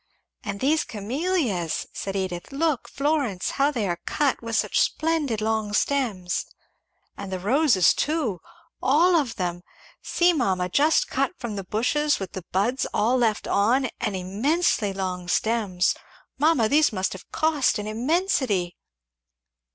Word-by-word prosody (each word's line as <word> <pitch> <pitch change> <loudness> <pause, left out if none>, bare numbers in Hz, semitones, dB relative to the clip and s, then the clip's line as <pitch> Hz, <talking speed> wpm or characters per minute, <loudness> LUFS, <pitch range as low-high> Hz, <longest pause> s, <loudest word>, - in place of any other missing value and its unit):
"And 200 - -5
these 305 +3 +2
Camellias," 230 - -2
said 195 0 -5
Edith, 185 0 -3
"look, 295 -1 -1
Florence, 275 -10 -1
how 275 +1 +2
they 235 -9 -2
are 175 -1 -2
cut 285 -4 0
with 230 -1 -4
such - - +1
splendid 310 -9 0
long 220 -1 -1
stems." 205 -8 0 0.7
"And 200 -1 -7
the 185 - -2
roses 220 - +3
too 270 - -1 0.4
all 320 +8 +4
of 280 -8 +1
them 175 -1 -3 0.4
see 350 0 +2
mamma, 190 - 0
just 300 - +3
cut 275 +6 -1
from 235 -4 -5
the 195 - -4
bushes 285 +10 0
with 195 -2 -5
the 185 -2 -7
buds 230 +8 0
all 235 +4 +2
left 230 -4 +1
on, 240 +6 +2
and 210 -3 -2
immensely 210 - 0
long 185 -2 -4
stems 200 -3 +1 0.5
Mamma, 295 -6 +3
these 300 +3 +4
must 190 -2 -1
have 190 - -12
cost 310 -4 +1
an 210 - -4
immensity! 235 - 0
230 Hz, 145 wpm, -24 LUFS, 195-290 Hz, 0.7 s, all